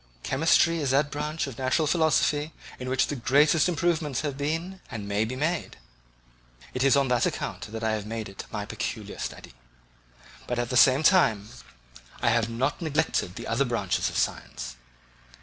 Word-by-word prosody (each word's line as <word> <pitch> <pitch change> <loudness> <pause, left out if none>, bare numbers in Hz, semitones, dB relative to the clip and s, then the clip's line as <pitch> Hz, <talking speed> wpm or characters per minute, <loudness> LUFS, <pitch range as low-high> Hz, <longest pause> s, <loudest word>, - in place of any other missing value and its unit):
Chemistry 165 +4 +3
is 140 -3 -1
that 140 +2 +2
branch 150 +2 -2
of 135 -4 -8
natural 130 +5 +1
philosophy 155 -1 +2 0.3
in 130 0 -5
which 130 0 +2
the 145 - -4
greatest 145 +6 +3
improvements 160 -5 0
have 145 -3 -3
been 165 +6 -3
and 105 -3 -6
may 105 +2 +1
be 125 +3 -4
made; 160 +5 -2 1.0
it 130 - -1
is 135 0 +5
on 140 -1 +2
that 125 -1 +2
account - - -5
that 110 0 -5
I 110 - +1
have 105 -1 -3
made 115 -1 -4
it 95 - -9
my - - -4
peculiar - - -5
study; - - -6 0.9
but 125 - -2
at 120 0 -2
the - - -1
same 135 +3 +6
time, 115 - +4 0.7
I 120 - +2
have 115 -1 +1
not 120 +9 -1
neglected 155 - 0
the - - -7
other 115 +4 +1
branches 115 -7 0
of - - -5
science. - - -3
135 Hz, 175 wpm, -26 LUFS, 115-155 Hz, 1.0 s, same